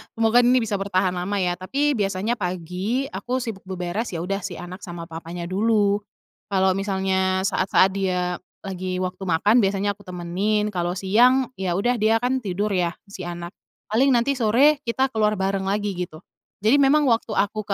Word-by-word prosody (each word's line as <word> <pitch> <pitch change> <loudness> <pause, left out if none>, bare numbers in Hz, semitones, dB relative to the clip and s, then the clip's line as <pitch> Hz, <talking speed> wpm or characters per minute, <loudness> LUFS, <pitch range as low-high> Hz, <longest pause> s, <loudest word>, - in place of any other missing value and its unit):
semoga 225 +1 +4
ini 245 0 +4
bisa 205 -3 -2
bertahan 185 -2 +1
lama 180 +3 -3
ya 175 0 -1
tapi 280 +10 0
biasanya 205 0 -1
pagi 185 +7 -2
aku 205 +7 -3
sibuk 195 -5 -7
beberes 185 +2 -3
ya 165 - -3
udah 195 +2 -2
si 185 -3 -6
anak 180 +2 -8
sama 175 -3 -7
papanya 165 +1 -7
dulu, 205 +2 +2 0.5
kalo 190 -1 +2
misalnya 190 -1 0
saat-saat 190 0 +3
dia 180 -2 -1 0.2
lagi 185 -1 -4
waktu 185 +1 -4
makan 205 +8 +4
biasanya 200 0 +1
aku 200 -1 -13
temenin 195 +4 -1
kalo 175 -1 -2
siang 245 +7 +3
ya 180 -2 -1
udah 240 +4 +1
dia 220 +1 +3
kan 260 +1 +1
tidur 205 -1 -2
ya 175 -2 0 0.2
si 185 -3 -7
anak, 175 0 -6 0.4
paling 255 +6 +3
nanti 260 +3 +1
sore 265 +7 +4
kita 260 +3 +1
keluar 215 -2 +1
bareng 190 0 -1
lagi 205 0 0
gitu, 170 -1 -6 0.4
jadi 260 +7 +5
memang 290 +2 +4
waktu 225 -1 0
aku 210 +1 -1
195 Hz, 175 wpm, -23 LUFS, 185-225 Hz, 0.5 s, jadi